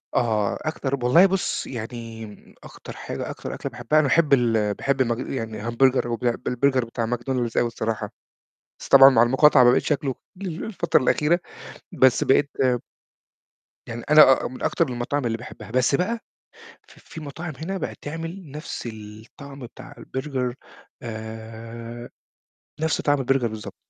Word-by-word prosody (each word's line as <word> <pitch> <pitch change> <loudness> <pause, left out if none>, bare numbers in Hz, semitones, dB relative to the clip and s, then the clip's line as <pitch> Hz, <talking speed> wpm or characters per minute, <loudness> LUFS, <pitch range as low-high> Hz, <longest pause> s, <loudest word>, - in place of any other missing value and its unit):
آه، 110 -4 +1
أكتر 140 -3 -2
ب 125 - -8
والله 165 +10 +6
بُصّ، 195 -1 -1
يعني 115 -2 -8
أكتر - - -11
حاجة، - - -6
أكتر - - -6
أكلة - - -5
باحبها، 125 +6 +1
أنا 150 - +2
باحب 150 +1 +3
ال 115 -5 +2
باحب 135 +5 -1
المج 120 -1 -1
يعني 110 -5 -4
همبرجر 130 +2 +2
وبع 120 0 -1
بالبرجر 130 0 +1
بتاع 115 0 -3
ماكدونالدز 120 0 -2
أوي 120 - +3
الصراحة، 115 -1 -3 0.7
بس - - -9
طبعًا 135 0 +9
مع 115 -3 +5
المقاطعة 130 +2 +5
ما 120 - +7
بقيتش 130 - +2
آكله 135 -2 -1 0.3
ال 175 -3 -4
الفترة 205 -8 +1
الأخيرة، 155 +6 +2 0.5
بس 130 -2 +4
بقيت 140 +1 +3 1.4
يعني 115 +1 -7
أنا 150 -3 +7
آه - - -1
من 130 +1 -9
أكتر 165 - +1
المطاعم 125 +3 -2
اللي 115 -1 -1
باحبها، 120 -1 -11
بس 130 +3 +2
بقى 230 +8 -1 0.7
ف - - -17
في 160 - -11
مطاعم 155 +3 -6
هنا 180 +6 -4
بقِت - - -5
تعمل 165 +2 -6
نفس 150 -4 -6
الطعم 110 +6 -12
بتاع 120 -2 -11
البرجر 130 -3 -4 0.5
آآ، 115 +1 -8 0.7
نفس 160 0 0
طعم 145 -1 +2
البرجر 135 -1 +1
بالضبط، 110 -1 -8
125 Hz, 155 wpm, -24 LUFS, 115-145 Hz, 1.4 s, طبعًا